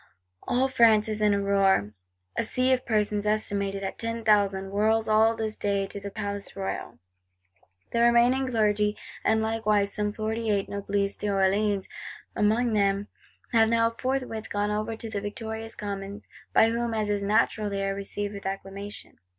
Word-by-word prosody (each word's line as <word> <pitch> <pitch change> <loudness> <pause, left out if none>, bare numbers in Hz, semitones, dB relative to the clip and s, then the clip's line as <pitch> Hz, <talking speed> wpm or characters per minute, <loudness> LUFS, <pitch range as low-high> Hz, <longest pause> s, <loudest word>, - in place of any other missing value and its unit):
All 255 +2 +1
France 225 -5 +4
is 215 -1 -3
in 210 -1 +4
a 200 - +2
roar; 195 - +2 0.4
a - - 0
sea 255 +1 +2
of 255 0 -2
persons, 210 -2 0
estimated 200 -2 -1
at 195 - -5
"ten 230 0 -3
thousand," 195 -2 +2
whirls 220 +2 +2
"all 220 +1 +4
this 220 -1 -3
day 200 -1 0
in 200 - -6
the 200 - -5
Palais 200 0 -4
Royal." 195 -1 -4 0.9
The 235 - +1
remaining 240 +3 +4
Clergy, 210 -3 +1 0.3
and 220 0 +2
likewise 215 -2 +1
some 210 0 -1
Forty 220 +1 -3
eight 200 -2 +1
Noblesse, 200 0 -1
D'Orléans 200 0 +1 0.5
among 225 +3 +2
them, 200 0 +1 0.4
have 225 -1 +5
now 230 0 +3
forthwith 250 -2 -3
gone 205 0 -1
over 215 +2 -2
to 225 - -6
the 210 -2 -4
victorious 220 +2 -5
Commons; 200 -1 -6 0.2
by 225 - +5
whom, 235 0 -1
as 215 -1 0
is 205 -1 0
natural, 210 +1 +1
they 195 0 -2
are 195 - 0
received 200 +1 -4
"with 200 -1 -6
acclamation." 195 +1 -7
210 Hz, 165 wpm, -27 LUFS, 200-225 Hz, 0.9 s, have